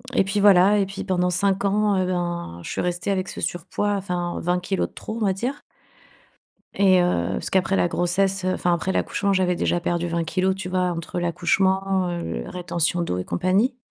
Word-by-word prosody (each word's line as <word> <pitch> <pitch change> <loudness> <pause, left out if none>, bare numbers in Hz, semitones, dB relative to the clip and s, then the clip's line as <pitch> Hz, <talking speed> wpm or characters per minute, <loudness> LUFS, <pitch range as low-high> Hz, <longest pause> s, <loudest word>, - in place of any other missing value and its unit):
et - - +5
puis 195 +2 -1
voilà. 200 +1 +6
Et 195 - +2
puis 195 +1 -6
pendant 180 -2 +1
5 195 +2 +1
ans 205 0 +2
et 185 - +1
ben, 175 - -3
je - - -7
suis - - -2
restée 180 +2 -2
avec 190 -1 -1
ce - - -7
surpoids 185 +4 -2
enfin: 180 -3 -2
«20 180 +1 +1
kilogrammes 190 +1 -1
de - - -30
trop», 220 - -7
on - - +2
va 195 - +2
dire. 245 +9 -4 1.1
Et 190 -2 +5
heu, 95 - +1
parce - - -4
qu'après 190 +1 +2
la - - +2
grossesse, 185 +3 0
heu, 185 - +1
enfin 175 - 0
après 185 +3 -2
l'accouchement, 200 +1 0
j'avais 185 -2 +1
déjà 175 - 0
perdu 175 0 -1
20 170 0 -1
kilogrammes, 185 +3 0
tu 190 -2 -6
vois, 185 0 0
entre 170 +1 -4
l'accouchement, 190 +2 +1
heu, 170 - -4
rétention 175 -1 -1
d'eau 90 - -2
et 90 - -3
compagnie. 200 +8 +1
185 Hz, 205 wpm, -23 LUFS, 175-195 Hz, 1.1 s, voilà